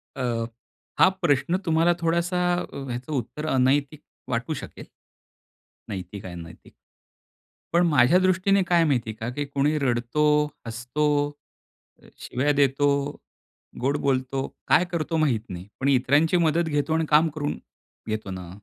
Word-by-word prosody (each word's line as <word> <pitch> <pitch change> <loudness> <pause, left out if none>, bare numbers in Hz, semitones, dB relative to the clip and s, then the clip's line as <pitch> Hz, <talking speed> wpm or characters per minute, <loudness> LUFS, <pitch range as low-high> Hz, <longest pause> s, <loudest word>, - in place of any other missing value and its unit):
अ, 135 - -3 0.8
हा - - +8
प्रश्न 170 +2 +2
तुम्हाला 165 +1 +3
थोडासा, 170 +2 0 0.5
ह्याचं 125 +3 -5
उत्तर 140 +4 -4
अनैतिक 140 +2 +1 0.3
वाटू 125 +6 -1
शकेल. 150 - -8 1.0
नैतिक 95 0 -7
आणि 90 - -7
अनैतिक. 85 +1 -14 1.0
पण 175 +1 +4
माझ्या 150 +2 +5
दृष्टीने 185 +1 +2
काय 175 -2 +4
माहितीये 120 -7 0
का? 110 +1 -5
की 145 +4 -3
कोणी 145 +2 0
रडतो, 125 +2 0 0.4
हसतो, 125 +6 -2 1.0
अ, - - -17
शिव्या 140 +4 0
देतो, 140 +1 +2 0.9
गोड 140 +3 +1
बोलतो, 135 0 0 0.2
काय 175 - +4
करतो 165 -1 -1
माहित 140 -9 +1
नाही. 90 0 -7
पण 130 - 0
इतरांची 145 +6 +3
मदत 165 0 +2
घेतो 145 +1 0
आणि 160 0 +1
काम 155 +2 +5
करून 145 -1 -2 0.5
घेतो 110 -2 -3
ना. 90 -2 -7
145 Hz, 130 wpm, -25 LUFS, 125-160 Hz, 1.0 s, हा